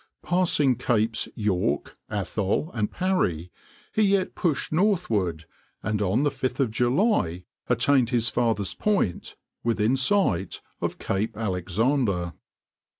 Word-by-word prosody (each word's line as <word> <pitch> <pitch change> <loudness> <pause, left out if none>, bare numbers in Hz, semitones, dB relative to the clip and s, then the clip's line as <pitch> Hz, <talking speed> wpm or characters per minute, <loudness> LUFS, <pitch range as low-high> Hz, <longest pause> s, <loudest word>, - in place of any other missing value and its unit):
Passing 165 -8 +2
Capes 110 -3 +1
York, 105 -4 -1
Atholl 100 - -1
and 105 -3 -1
Parry, 95 - -1 0.4
he 215 - +2
yet 195 -2 +2
pushed 160 -6 -1
northward, 115 - +1 0.4
and 105 0 -1
on 105 +7 +2
5th 130 -4 0
July 120 - +1 0.2
attained 135 -4 +3
his 120 -2 +1
farthest 110 -4 0
point 200 - 0 0.3
within 115 +1 +2
sight 135 - +1 0.2
of - - -2
Cape 105 +2 -2
Alexander. 100 -1 0
115 Hz, 105 wpm, -25 LUFS, 100-145 Hz, 0.4 s, attained